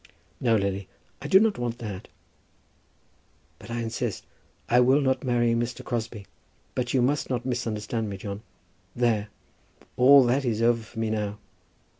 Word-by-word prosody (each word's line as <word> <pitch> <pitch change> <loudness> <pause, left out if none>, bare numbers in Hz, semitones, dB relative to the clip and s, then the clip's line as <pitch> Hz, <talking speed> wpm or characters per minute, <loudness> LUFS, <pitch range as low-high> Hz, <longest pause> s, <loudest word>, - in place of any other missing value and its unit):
"No, 115 -3 +3
Lily, 100 -2 -1 0.3
I - - -5
do 190 - +7
not 215 - +2
want 120 -1 -2
that." 105 -5 -7 1.5
"But - - -13
I 115 0 -2
insist. 115 -1 -3 0.4
I 120 - +4
will 130 +3 +5
not 130 -2 +1
marry 120 -2 +2
Mr. 120 +1 -2
Crosbie. 115 -4 -4 0.5
But 125 -1 -2
you 130 -2 +2
must 140 +3 0
not 125 -2 -2
misunderstand 115 -3 -2
me, 100 - -5
John. 100 +1 -6 0.5
There; 115 -4 +1 0.7
all 135 +2 +8
that 125 +3 +1
is 115 -4 -1
over 115 0 +3
for 110 +1 -15
me 115 -1 -1
now. 105 -1 -2
120 Hz, 155 wpm, -26 LUFS, 110-125 Hz, 1.5 s, all